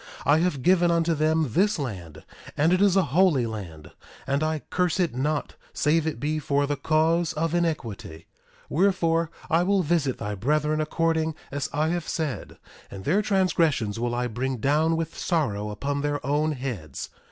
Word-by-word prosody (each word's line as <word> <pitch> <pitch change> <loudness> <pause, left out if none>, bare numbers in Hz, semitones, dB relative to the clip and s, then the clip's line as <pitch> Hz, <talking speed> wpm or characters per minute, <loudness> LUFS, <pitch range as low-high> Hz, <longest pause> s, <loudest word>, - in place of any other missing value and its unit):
I 150 +2 +5
have 165 -7 0
given 175 -1 +4
unto 170 0 +2
them 155 -4 +1
this 205 - +2
land, 95 - -6 0.3
and 160 +4 +3
it 185 - +2
is 200 -2 +4
a 195 - +4
holy 165 -8 +4
land; 90 -9 -7 0.3
and 140 +1 0
I 155 -1 -1
curse 180 0 +1
it 170 -8 +1
not 145 +4 -1 0.2
save 155 +1 +1
it 160 - -3
be 155 +1 -1
for 145 -1 +1
the 145 +1 -1
cause 160 +3 +1
of 165 +1 -1
iniquity; 120 - -3 0.4
wherefore, 165 -2 +2 0.2
I 165 -1 +3
will 195 +1 +2
visit 145 -5 0
thy 105 -2 -4
brethren 150 +8 0
according 160 0 0 0.2
as 140 0 -3
I 155 +2 0
have 175 -1 -2
said; 155 -5 -4 0.3
and 95 -1 -9
their 195 +7 +3
transgressions 165 - +1
will 120 0 -1
I 125 0 -1
bring 125 +3 -2
down 155 +7 +2
with 165 -1 -3
sorrow 105 - -1
upon 140 +7 -3
their 145 -2 -2
own 150 +3 +1
heads. 125 - -6
155 Hz, 175 wpm, -25 LUFS, 130-165 Hz, 0.4 s, I